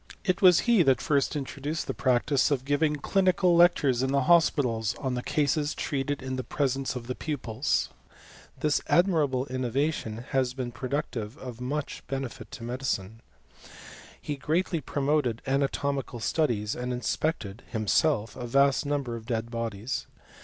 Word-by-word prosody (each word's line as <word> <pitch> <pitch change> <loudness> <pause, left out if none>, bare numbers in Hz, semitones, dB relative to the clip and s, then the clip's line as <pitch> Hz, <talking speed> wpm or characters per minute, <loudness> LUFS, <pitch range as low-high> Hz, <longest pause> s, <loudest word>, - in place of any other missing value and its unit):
It 185 0 +1
was 180 -3 +7
he 235 -5 +4
that 135 -5 +4
first 145 -2 +1
introduced 145 +2 -3
the - - -3
practice 130 +2 +2
of 135 -3 -1
giving 150 +2 +2
clinical 185 +3 +2
lectures 160 -7 +4
in 130 0 0
the 140 -1 +2
hospitals, 125 -9 +3
on 130 -2 -3
the 125 - -2
cases 145 +2 0
treated 140 -1 -2
in 130 0 -3
the 130 - -2
presence 135 -1 -1
of 125 -2 -5
the 125 - -3
pupils. 130 -3 -1 0.7
This 150 -1 +2
admirable 155 -8 +2
innovation 130 -2 -2
has 130 -2 0
been 125 -2 -4
productive 130 -3 -4
of 125 -4 -8
much 140 +4 -3
benefit 135 -3 -5
to 120 -1 -9
medicine. 115 -4 -3 1.0
He 145 - -4
greatly 165 +3 0
promoted 140 -6 0
anatomical 140 -1 -1
studies, 110 -5 0
and 125 0 -4
inspected, 125 -3 -2
himself, 110 0 +1
a 120 - -5
vast 140 +3 +3
number 140 -5 -1
of 115 -1 -9
dead 115 -1 -2
bodies. 115 0 -3
135 Hz, 145 wpm, -28 LUFS, 120-150 Hz, 1.0 s, was